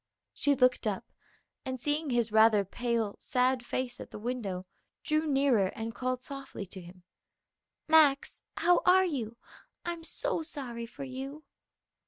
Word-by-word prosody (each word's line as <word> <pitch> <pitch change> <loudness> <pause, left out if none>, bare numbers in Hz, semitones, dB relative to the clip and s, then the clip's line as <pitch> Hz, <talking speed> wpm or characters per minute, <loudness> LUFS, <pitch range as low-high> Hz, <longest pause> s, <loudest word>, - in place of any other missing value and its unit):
She 285 -1 +2
looked 250 -2 +3
up, 200 -3 -3 0.5
and 260 -1 -4
seeing 295 +3 0
his 240 -3 +1
rather 220 -2 +5
pale, 230 0 -1
sad 255 0 +1
face 250 0 -3
at - - -8
the - - -8
window, 210 -5 -3 0.4
drew 310 0 +1
nearer 270 -8 +3
and 225 0 -4
called 255 0 -2
softly 275 -6 -7
to 185 0 -10
him, 180 +1 -14 0.8
"Max, 305 -3 +4 0.2
how 355 +1 +4
are 375 +1 +6
you? 235 -9 -3 0.5
I'm 340 -1 -4
so - - -2
sorry 250 -7 -6
for 260 - -9
you." 270 +3 -6
255 Hz, 145 wpm, -30 LUFS, 225-290 Hz, 0.8 s, are